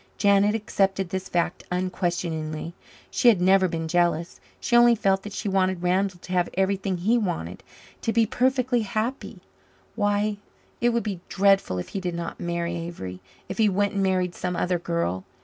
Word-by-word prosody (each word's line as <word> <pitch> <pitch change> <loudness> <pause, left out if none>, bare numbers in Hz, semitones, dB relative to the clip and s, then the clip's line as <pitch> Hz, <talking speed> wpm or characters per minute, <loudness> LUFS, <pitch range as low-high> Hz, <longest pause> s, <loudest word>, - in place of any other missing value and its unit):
Janet 200 +1 +4
accepted 195 -3 0
this 190 0 -4
fact 175 0 -1
unquestioningly. 170 -3 -2 0.4
She - - +2
had 220 -6 +6
never 190 +1 +4
been 165 -1 -3
jealous. 170 0 0 0.2
She 240 - 0
only 240 0 +7
felt 195 -3 +1
that 210 - -8
she 200 - -4
wanted 185 -2 +1
Randall 185 +1 +1
to 185 - -10
have 180 -1 +1
everything 190 0 0
he 220 +7 +2
wanted 90 - -3 0.4
to 225 - 0
be 230 0 +3
perfectly 255 +1 +1
happy. 220 -1 -3 0.5
Why, 205 0 0 0.4
it 240 - +3
would 235 -1 0
be 200 -5 -3
dreadful 195 - +3
if 90 - -5
he 195 - -4
did 175 -2 -3
not 170 0 -5
marry 170 0 -2
Avery 165 - -6 0.3
if - - -6
he 215 -2 +5
went 200 +1 0
and 200 - 0
married 185 -2 +1
some 180 0 -3
other 180 0 0
girl. 165 - -2
190 Hz, 175 wpm, -25 LUFS, 175-205 Hz, 0.5 s, only